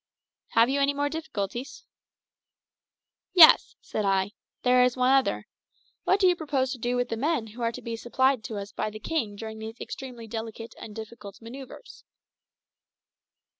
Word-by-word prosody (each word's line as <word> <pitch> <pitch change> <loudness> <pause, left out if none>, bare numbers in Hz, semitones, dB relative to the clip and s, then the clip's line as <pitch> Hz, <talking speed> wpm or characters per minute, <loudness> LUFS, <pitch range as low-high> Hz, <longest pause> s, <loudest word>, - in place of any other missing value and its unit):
"Have 230 +1 +6
you 275 +2 +1
any 280 +1 +2
more 285 0 0
difficulties?" 285 - -5 1.5
"Yes," 340 -4 +8
said 215 - -3
I. 195 0 +1 0.3
"There 250 0 +5
is 250 0 +1
one 255 +1 +3
other. 270 -1 +2 0.6
What 390 - +3
do 390 - +4
you 360 - +4
propose 280 -5 -1
to 260 - -5
do 245 +2 -1
with 245 0 0
the - - -1
men 275 0 0
who 225 +3 -11
are 230 0 +1
to - - -9
be 230 -1 -4
supplied 255 +1 +1
us 200 -1 -5
by - - -2
the 215 - -8
king 225 -6 -2
during 220 +1 -7
these 220 +1 -8
extremely 250 -4 -7
delicate 225 0 -6
and 210 - -9
difficult 220 -3 -9
manoeuvres?" 260 - -11
240 Hz, 165 wpm, -27 LUFS, 220-275 Hz, 1.5 s, Yes